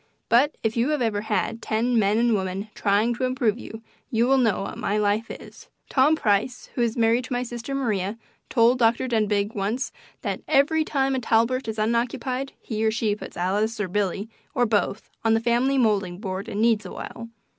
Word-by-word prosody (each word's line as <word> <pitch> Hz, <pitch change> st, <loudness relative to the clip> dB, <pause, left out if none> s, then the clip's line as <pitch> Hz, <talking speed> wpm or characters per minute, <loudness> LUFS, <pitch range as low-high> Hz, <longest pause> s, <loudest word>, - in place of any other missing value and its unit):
But 265 Hz, +6 st, +4 dB
if 225 Hz, -1 st, 0 dB
you 240 Hz, +4 st, +1 dB
have 300 Hz, -3 st, 0 dB
ever 210 Hz, -3 st, 0 dB
had 225 Hz, +1 st, -1 dB
ten 230 Hz, +2 st, +1 dB
men 205 Hz, +1 st, +2 dB
and 235 Hz, 0 st, +3 dB
women 195 Hz, +1 st, -2 dB
trying 210 Hz, +4 st, +2 dB
to 240 Hz, -, -4 dB
improve 245 Hz, -3 st, +1 dB
you, 225 Hz, -1 st, -9 dB, 0.3 s
you 230 Hz, -2 st, +2 dB
will 265 Hz, +1 st, +4 dB
know 225 Hz, -6 st, +2 dB
what -, -, -6 dB
my 205 Hz, -, 0 dB
life 210 Hz, +2 st, +1 dB
is. -, -, -11 dB, 0.2 s
Tom 285 Hz, +4 st, +4 dB
Price, 220 Hz, -1 st, 0 dB
who 240 Hz, -2 st, +1 dB
married 230 Hz, +2 st, +2 dB
my 245 Hz, -1 st, -1 dB
sister 240 Hz, +3 st, -5 dB
Maria, 215 Hz, -6 st, -1 dB, 0.3 s
told 240 Hz, +1 st, +4 dB
Dr. 235 Hz, +2 st, +3 dB
Denbigh 210 Hz, -2 st, +1 dB
once 215 Hz, +7 st, -2 dB, 0.3 s
that -, -, -2 dB
"every 310 Hz, +3 st, +3 dB
time 270 Hz, -3 st, 0 dB
a 260 Hz, -, 0 dB
Talbert 230 Hz, +2 st, +1 dB
is 220 Hz, 0 st, -4 dB
unoccupied 245 Hz, +4 st, -1 dB
he 220 Hz, -2 st, -3 dB
or 220 Hz, -, +4 dB
she 215 Hz, -1 st, 0 dB
puts -, -, -10 dB
Alice 210 Hz, +5 st, 0 dB
or 205 Hz, -, -1 dB
Billy, 200 Hz, +2 st, -1 dB, 0.3 s
or 245 Hz, -2 st, +3 dB
both, 215 Hz, -2 st, 0 dB, 0.2 s
on 225 Hz, 0 st, +4 dB
the -, -, +3 dB
family 240 Hz, +4 st, +2 dB
moulding 205 Hz, -7 st, +1 dB
board 190 Hz, -1 st, -5 dB
and 210 Hz, +2 st, -1 dB
kneads 230 Hz, -2 st, +3 dB
awhile." 230 Hz, 0 st, -8 dB
230 Hz, 190 wpm, -24 LUFS, 210-250 Hz, 0.3 s, But